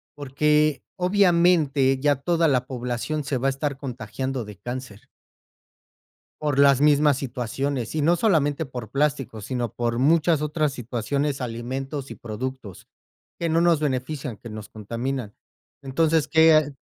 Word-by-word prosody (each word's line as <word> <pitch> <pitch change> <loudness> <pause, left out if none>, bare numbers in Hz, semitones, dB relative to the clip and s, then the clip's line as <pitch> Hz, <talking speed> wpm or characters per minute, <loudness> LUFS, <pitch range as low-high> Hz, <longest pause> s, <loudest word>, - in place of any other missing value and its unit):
Porque, 150 +1 +1
obviamente, 170 -8 +3
ya 145 +1 +3
toda 165 +4 +1
la 130 -4 +1
población 125 +4 -3
se 135 - -1
va 130 +2 0
a - - +4
estar 140 +1 -2
contagiando 130 -1 -5
de 105 0 -10
cáncer. 120 -2 -7 1.3
Por 150 -2 -1
las 140 -1 +5
mismas 145 -1 +4
situaciones 130 0 -3
y 155 - 0
no 165 +4 +3
solamente 160 -7 +1
por 125 -6 -8
plástico, 135 -5 -1
sino 120 0 -3
por 120 -1 -1
muchas 160 +3 +3
otras 150 -1 0
situaciones, 135 +3 -2
alimentos 130 +4 -5
y - - -6
productos, 120 -3 -7 0.5
que 170 -1 -1
no 165 +1 +3
nos 170 -2 +4
benefician, 130 -3 -3
que 120 - -10
nos 110 -1 -8
contaminan. 115 +2 -4 0.5
Entonces 155 +3 +1
qué 160 0 +6
a 155 -2 +3
135 Hz, 145 wpm, -24 LUFS, 125-150 Hz, 1.3 s, qué